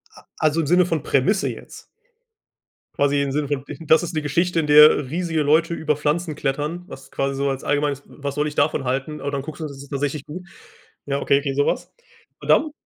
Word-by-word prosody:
A -, -, -16 dB, 0.2 s
also 155 Hz, +1 st, +2 dB
im 145 Hz, -, -3 dB
Sinne 180 Hz, +1 st, +4 dB
von 160 Hz, -4 st, -1 dB
Prämisse 190 Hz, +10 st, +1 dB
jetzt? -, -, -10 dB, 1.1 s
Quasi 145 Hz, 0 st, +3 dB
im 140 Hz, -, -1 dB
Sinne 145 Hz, +1 st, -1 dB
von 140 Hz, -2 st, -2 dB
d 145 Hz, 0 st, -9 dB
das 160 Hz, +3 st, +5 dB
ist 170 Hz, -, -5 dB
'ne 155 Hz, -, -1 dB
Geschichte, 170 Hz, +4 st, 0 dB
in 150 Hz, -, -1 dB
der 150 Hz, -2 st, +7 dB
riesige 165 Hz, 0 st, -1 dB
Leute 160 Hz, +3 st, +3 dB
über 155 Hz, -2 st, 0 dB
Pflanzen 150 Hz, +2 st, -1 dB
klettern, 150 Hz, +5 st, -2 dB
was 135 Hz, -, -12 dB
quasi 135 Hz, 0 st, -1 dB
so 140 Hz, +1 st, -1 dB
als 135 Hz, 0 st, -3 dB
allgemeines 145 Hz, -1 st, 0 dB
was 140 Hz, -1 st, -6 dB
soll 150 Hz, +1 st, 0 dB
ich 150 Hz, -, -4 dB
davon 145 Hz, -1 st, +1 dB
halten? 135 Hz, +4 st, -3 dB
Und 140 Hz, -, -3 dB
dann 140 Hz, -, -2 dB
guckst 155 Hz, +3 st, -9 dB
du, -, -, -3 dB
und 155 Hz, -, -4 dB
das 140 Hz, -, -11 dB
ist 140 Hz, -, -11 dB
tatsächlich 145 Hz, 0 st, -3 dB
gut. 180 Hz, +5 st, -8 dB, 0.6 s
Ja, 140 Hz, 0 st, -2 dB
okay, 140 Hz, -, +3 dB
okay, 140 Hz, -1 st, -3 dB
so 145 Hz, +1 st, +2 dB
was. -, -, -2 dB, 0.5 s
Und -, -, -9 dB
dann 310 Hz, -, +4 dB
150 Hz, 230 wpm, -22 LUFS, 140-160 Hz, 1.1 s, der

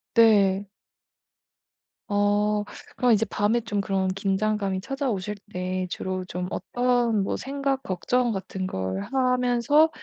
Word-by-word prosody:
네. 205 Hz, -4 st, +5 dB, 1.4 s
어. 205 Hz, 0 st, +2 dB, 0.3 s
그럼 250 Hz, -1 st, +3 dB
이제 220 Hz, +1 st, +3 dB
밤에 220 Hz, +3 st, +1 dB
좀 215 Hz, -3 st, -2 dB
그런 195 Hz, -1 st, 0 dB
긴장감이 195 Hz, 0 st, 0 dB
찾아오실 210 Hz, -6 st, -2 dB, 0.2 s
때 185 Hz, 0 st, -2 dB
주로 185 Hz, +1 st, -3 dB
좀 180 Hz, 0 st, -4 dB
어떤 245 Hz, -4 st, +1 dB
뭐 -, -, -1 dB
생각, 275 Hz, -1 st, -2 dB
걱정 245 Hz, +4 st, 0 dB
같은 190 Hz, -2 st, -4 dB
걸 95 Hz, -, -3 dB
하면서 255 Hz, +3 st, +3 dB
210 Hz, 215 characters per minute, -25 LUFS, 190-245 Hz, 1.4 s, 네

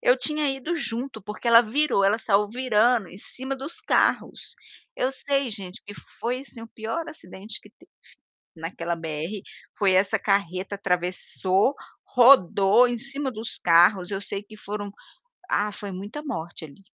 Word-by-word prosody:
eu 250 Hz, -, +4 dB
tinha 300 Hz, +2 st, +2 dB
ido 270 Hz, +6 st, -3 dB
junto, 245 Hz, -4 st, -4 dB
porque 210 Hz, +4 st, -5 dB
ela 230 Hz, 0 st, +9 dB
virou, 240 Hz, -2 st, +1 dB
ela 205 Hz, +3 st, +3 dB
saiu 205 Hz, -1 st, +2 dB
virando 235 Hz, -2 st, +2 dB
em 190 Hz, -, -12 dB
cima 265 Hz, +5 st, -4 dB
dos 280 Hz, +6 st, -4 dB
carros. -, -, 0 dB, 0.4 s
Eu 255 Hz, -, 0 dB
sei, 275 Hz, -1 st, 0 dB
gente, 195 Hz, -3 st, -6 dB
que 205 Hz, -, -9 dB, 0.3 s
foi, 250 Hz, +3 st, -2 dB
assim, 240 Hz, -4 st, -11 dB
o 230 Hz, -, -10 dB
pior 225 Hz, +8 st, -4 dB
acidente 210 Hz, -, -8 dB
que -, -, -17 dB
teve -, -, -24 dB, 0.7 s
naquela 170 Hz, +1 st, -4 dB
BR, 165 Hz, +5 st, -5 dB, 0.4 s
foi 195 Hz, -2 st, +3 dB
essa 195 Hz, +4 st, +3 dB
carreta, 195 Hz, -1 st, -1 dB
atravessou, 185 Hz, +3 st, 0 dB, 0.3 s
rodou 235 Hz, -3 st, +6 dB
em 240 Hz, 0 st, -2 dB
cima 275 Hz, +1 st, -3 dB
dos 225 Hz, 0 st, -5 dB
carros, 180 Hz, +3 st, +4 dB
eu 195 Hz, 0 st, -3 dB
sei 200 Hz, 0 st, -5 dB
que 215 Hz, +1 st, -14 dB
foram 205 Hz, -1 st, -6 dB, 0.6 s
ah, 210 Hz, +1 st, +1 dB
foi 200 Hz, 0 st, -7 dB
muita 205 Hz, +11 st, -7 dB
morte 170 Hz, -, -5 dB
ali. 155 Hz, +6 st, -16 dB
210 Hz, 160 wpm, -25 LUFS, 190-250 Hz, 0.7 s, ela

